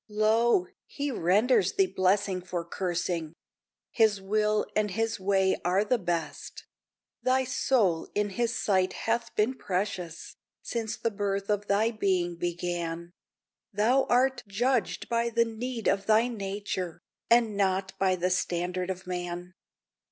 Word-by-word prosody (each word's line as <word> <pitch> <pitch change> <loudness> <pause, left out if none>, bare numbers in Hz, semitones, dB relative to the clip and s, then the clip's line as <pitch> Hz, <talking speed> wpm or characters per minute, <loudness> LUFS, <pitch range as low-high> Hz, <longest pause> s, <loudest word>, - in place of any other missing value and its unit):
Lo! 215 -1 +3 0.2
he 285 0 -3
renders 205 +1 +3
thee 195 - +4
blessing 190 0 +1
for 175 -1 -4
cursing! 175 -2 -2 0.6
His 220 -3 +3
will 210 +2 +1
and 215 -1 +2
His 225 +3 -1
way 190 0 +2
are 185 +4 +2
the 245 +2 +1
best. 175 -4 -4 0.6
Thy 260 +1 +2
soul 225 -9 +1
in 205 -1 0
His 240 +4 -1
sight 185 -2 +1
hath 230 +1 -1
been 215 +5 +2
precious, 185 -6 -4 0.3
Since 225 -2 -3
the 230 - -1
birth 200 0 -2
of 205 0 -1
thy 215 +3 +2
being 185 -5 0
began; 170 -1 -3 0.6
Thou 230 +6 +3
art 260 +1 +2
judged 240 +4 0
by 235 0 +1
the 235 0 +2
need 230 +1 -4
of 195 0 +1
thy 220 +2 +4
nature, 195 -5 -4 0.3
And 230 -3 +4
not 190 -1 0
by 190 -1 +3
the 180 +1 -1
standard 180 +1 -1
of 190 0 -4
man." 175 0 -5
200 Hz, 135 wpm, -28 LUFS, 180-225 Hz, 0.6 s, thee